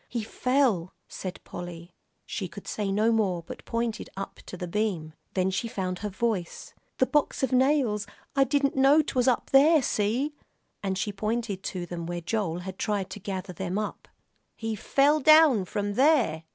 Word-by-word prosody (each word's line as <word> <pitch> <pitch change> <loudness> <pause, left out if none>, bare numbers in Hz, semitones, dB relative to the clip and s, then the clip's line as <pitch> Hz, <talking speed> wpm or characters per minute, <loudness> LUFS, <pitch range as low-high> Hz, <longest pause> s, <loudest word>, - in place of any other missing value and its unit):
"He 235 -3 -2
fell," 240 -7 +1
said 185 -1 -6
Polly. 175 0 -8 0.3
She 190 - -4
could 175 +4 -11
say 205 -2 -2
no 215 +3 +3
more, 195 -6 +1
but - - -9
pointed 230 -1 -2
up 195 - -6
to 185 - -7
the 180 - -5
beam. 175 -5 -2 0.2
Then 185 0 +2
she 195 +5 -1
found 185 -4 -3
her 210 - -3
voice. 195 -3 -3 0.2
"The 260 - +4
box 295 0 0
of 265 - +1
nails 255 -6 +2 0.3
I 275 - +5
didn't 280 0 +1
know 275 +3 +5
'twas 255 -3 0
up 250 - +1
there, 295 +2 +6
see!" 240 +8 0 0.5
and 190 -2 -2
she 205 +2 -2
pointed 215 -1 -2
to 180 -2 -3
them, 170 -1 -6
where 175 0 -3
Joel 175 -1 -2
had 190 +1 -8
tried 205 -3 -1
to - - -6
gather 190 -2 -5
them 185 +2 -3
up. 215 -1 -4 0.5
"He 225 -1 -3
fell 280 +8 +3
down 310 -8 +6
from 205 +2 -2
there?" 245 - +3
210 Hz, 180 wpm, -27 LUFS, 185-255 Hz, 0.5 s, there